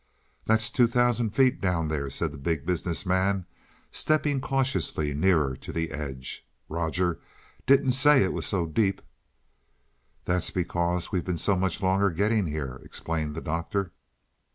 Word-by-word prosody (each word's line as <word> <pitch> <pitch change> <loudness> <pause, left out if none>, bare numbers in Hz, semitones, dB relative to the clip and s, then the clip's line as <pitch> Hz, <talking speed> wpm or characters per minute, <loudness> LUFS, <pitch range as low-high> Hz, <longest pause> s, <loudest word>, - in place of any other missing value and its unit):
"That's 110 +1 +2
two 120 -2 +4
thousand 120 -1 +2
feet 130 +5 +2
down 90 -4 0
there," 70 -3 -2
said 75 +3 -2
the 75 - -10
Big 75 0 -2
Business 90 +1 -1
Man, 95 0 +1 0.5
stepping 145 -3 +1
cautiously 100 - 0
nearer 75 -4 +2
to - - -8
the 80 0 -2
edge. 70 -4 -5 0.2
"Rogers 85 +2 -1 0.5
didn't 135 0 +5
say 135 0 +6
it 95 - -1
was - - -1
so 90 -4 +1
deep." 95 +4 0 1.2
"That's 90 0 +1
because 85 -1 -1
we've 90 -3 0
been 90 -2 -2
so 100 +4 +3
much 95 +1 -1
longer 95 +2 +3
getting 100 +3 +1
here," 70 -4 -5
explained 80 -2 -3
the 80 - -4
Doctor. 85 +4 -2
90 Hz, 150 wpm, -27 LUFS, 80-105 Hz, 1.2 s, say